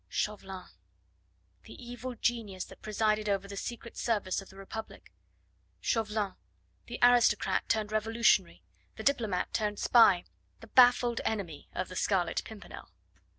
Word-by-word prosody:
Chauvelin! 195 -3 -4 1.0
the - - -11
evil 245 +1 -7
genius 220 -5 -2
that - - -15
presided 215 0 0
over 195 -1 0
the 200 - -8
Secret 235 +3 -6
Service 205 -5 -1
of 195 - -14
the 190 - -16
Republic. 195 +3 -9 0.7
Chauvelin 215 -3 -1 0.5
the - - -6
aristocrat 240 -4 +4
turned 215 -1 0
revolutionary, 215 - +2 0.3
the - - -7
diplomat 220 -10 0
turned 210 -1 -1
spy, 200 -8 +5 0.4
the - - -12
baffled 245 0 +5
enemy 185 -9 -4
of 185 - -2
the 185 - -10
Scarlet 185 -2 +1
Pimpernel. 215 - -11
215 Hz, 130 wpm, -30 LUFS, 195-230 Hz, 1.0 s, spy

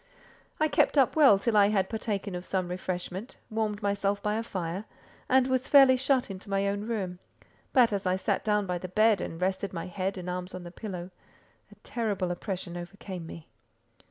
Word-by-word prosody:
I 310 - +4
kept 290 0 +2
up 270 -3 +4
well 285 -10 +7
till 220 +3 0
I 205 -1 +7
had 195 -3 +1
partaken 210 -3 -3
of 180 0 -4
some 185 -1 -2
refreshment, 185 +4 -5
warmed 215 -1 -2
myself 200 0 0
by 210 - +1
a 220 - 0
fire, 185 -2 -4 0.4
and 260 0 +5
was 260 0 0
fairly 270 -2 +7
shut 260 -3 +1
into 190 +1 -9
my 195 0 +1
own 205 +2 -2
room; 190 -6 -3 0.5
but, 240 -4 +5
as 195 -1 -1
I 185 - +2
sat 190 - -1
down 210 -1 +1
by 180 -1 -2
the 185 - -6
bed 215 +1 +3
and 165 - -5
rested 190 +2 -1
my 165 - -4
head 190 +2 -3
and 180 -1 -6
arms 180 +1 -4
on 180 - -7
the 175 - -9
pillow, 185 -3 -6 0.6
a - - -14
terrible 205 -7 -2
oppression 180 -1 -4
overcame 175 -1 -7
me. 165 -1 -10
200 Hz, 195 wpm, -28 LUFS, 180-220 Hz, 0.6 s, well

